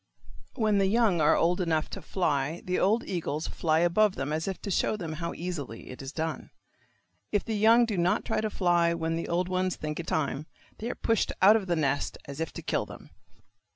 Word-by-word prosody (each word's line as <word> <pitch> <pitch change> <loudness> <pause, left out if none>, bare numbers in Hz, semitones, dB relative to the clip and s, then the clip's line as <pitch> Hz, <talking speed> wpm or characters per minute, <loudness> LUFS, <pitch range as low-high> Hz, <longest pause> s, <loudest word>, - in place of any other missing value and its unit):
When 215 -4 +2
the 195 - +3
young 210 -5 +3
are 150 - +5
old 175 +3 +2
enough 160 -3 0
to - - -6
fly 155 -3 -1
the 180 0 0
old 220 +5 +2
eagles 160 -4 -3
fly 160 -1 +1
above 190 +4 +3
them 140 +3 -3
as 160 +3 -2
if 190 - -3
to 200 - -3
show 210 - +1
them 165 -5 -5
how 170 0 -3
easily 155 -12 -6
it 125 - -9
is 135 0 -6
done. 160 +1 -4 0.8
If 205 - 0
the 225 - -2
young 225 +3 +5
do 210 -5 -2
not 175 +1 +1
try - - 0
to 215 - -1
fly 175 -4 +2
when 165 0 -1
the 165 - -3
old 175 +1 0
ones 185 0 0
think 150 +1 -5
it 170 - -5
time, 150 0 -1 0.3
they 230 - -3
are - - -3
pushed 225 -2 +1
out 200 +3 +7
of 205 -4 -1
the 175 - +1
nest 145 -3 0
as 140 +1 -8
if 160 - -2
to - - -7
kill - - -1
them. - - -12
175 Hz, 220 wpm, -28 LUFS, 160-200 Hz, 0.8 s, out